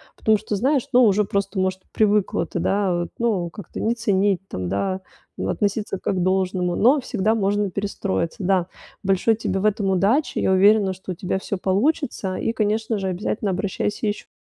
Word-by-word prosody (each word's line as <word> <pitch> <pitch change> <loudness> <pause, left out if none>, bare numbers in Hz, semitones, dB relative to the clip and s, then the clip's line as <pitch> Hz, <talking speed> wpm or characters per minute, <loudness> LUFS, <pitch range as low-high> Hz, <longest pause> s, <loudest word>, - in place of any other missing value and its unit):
Потому 220 -1 +3
что, 210 0 -4
знаешь, 265 +5 +1
ну, 250 +1 +6
уже 210 -2 +4
просто, 195 0 -2
может, 185 0 -1
привыкла 210 -5 +2
ты, 175 - -4
да, 195 +1 +1
вот, 175 - -3
ну, 205 -8 0
как-то 205 +3 -8
не 225 - +1
ценить 200 -4 +1
там, 90 -1 -4
да, 190 - -1 0.4
э, - - -4
относиться 205 -2 -1
как - - -1
к - - -1
должному, 185 -1 0
но 265 +6 +4
всегда 220 -2 0
можно 205 -1 +1
перестроиться, 195 -2 -3
да. 185 -2 +2 0.4
Большой 195 +3 +2
тебе 200 -3 -2
в 200 - -2
этом 210 -2 +1
удачи, 200 - +2
я - - +2
уверена, 200 0 +4
что 185 0 -8
у - - -4
тебя 190 +1 -2
всё 200 - -4
получится, 200 - 0
и, 225 - -1
конечно 220 0 0
же, 190 - -2
обязательно 200 +2 -2
обращайся 200 +3 -2
еще. 205 - -3
200 Hz, 185 wpm, -22 LUFS, 190-215 Hz, 0.4 s, ну